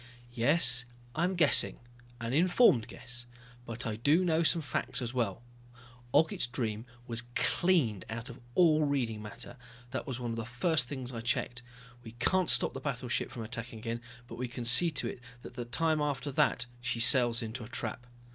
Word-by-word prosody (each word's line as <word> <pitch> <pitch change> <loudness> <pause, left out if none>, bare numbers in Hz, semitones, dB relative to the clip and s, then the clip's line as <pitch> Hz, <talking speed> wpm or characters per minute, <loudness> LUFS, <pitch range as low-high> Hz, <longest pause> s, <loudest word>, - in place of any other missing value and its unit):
"Yes, 125 +1 +5 0.3
I'm 175 +4 0
guessing 155 -5 +5 0.4
an 115 +1 -4
informed 170 - +4
guess 120 -1 -9 0.4
but 115 +1 -6
I 110 -2 -3
do 150 +10 +3
know 165 -1 +2
some 165 0 +2
facts 140 - -2
as 120 -1 -4
well. 115 -3 -2 0.7
Ogget's 160 -6 +2
Dream 115 -2 -4 0.2
was 115 -1 -2
cleaned 150 - +1
out 115 +1 -6
of 120 - -10 0.2
all 155 -3 +4
reading 125 -7 -1
matter, 105 +4 -8 0.3
that - - -4
was 130 -2 -4
one 120 -2 -4
of 115 - -4
the 115 - -3
first 125 +4 0
things 130 -2 -6
I 115 -2 -6
checked. 120 +1 -2 0.4
We 115 -2 -11
can't 180 +10 +1
stop - - +2
the - - -6
battleship 130 -3 -3
from 115 - -7
attacking 115 +1 -6
again, 115 +1 -5 0.3
but - - -10
we 125 - -2
can 120 0 -7
see 120 +9 +8
to 145 -4 -2
it - - -6 0.2
that - - -10
the 120 -1 -6
time 155 +6 0
after 145 -1 -2
that 120 -2 +1 0.2
she 120 -1 -2
sails 120 -1 +5
into 115 +2 -6
a - - -9
trap." 120 0 -5
125 Hz, 185 wpm, -31 LUFS, 115-145 Hz, 0.7 s, see